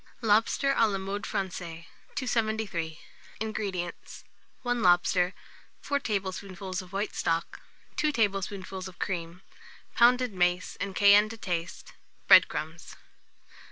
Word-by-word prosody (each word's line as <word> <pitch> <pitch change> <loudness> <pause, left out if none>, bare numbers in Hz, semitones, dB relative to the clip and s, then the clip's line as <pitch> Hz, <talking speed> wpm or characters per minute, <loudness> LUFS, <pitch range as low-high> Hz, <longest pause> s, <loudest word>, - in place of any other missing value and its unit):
LOBSTER 225 +6 +3
(a 225 - +4
la 200 -2 -1
Mode 195 +2 -4
Francaise). 170 -4 -4 0.3
273. 220 - -1 0.4
INGREDIENTS. 200 -5 -4 0.4
1 245 -1 0
lobster, 180 0 +3 0.5
4 285 0 -1
tablespoonfuls 190 -4 -4
of 185 -1 -14
white 200 +2 -2
stock, 165 0 -2 0.4
2 305 - +2
tablespoonfuls 195 -4 -2
of 185 - -12
cream, 175 -1 -4 0.5
pounded 245 -1 +4
mace, 180 0 0
and 195 -1 -3
cayenne 205 +1 +6
to 225 - -8
taste; 175 -5 -4 0.3
bread - - +9
crumbs. 160 +2 -6
195 Hz, 115 wpm, -28 LUFS, 180-220 Hz, 0.5 s, bread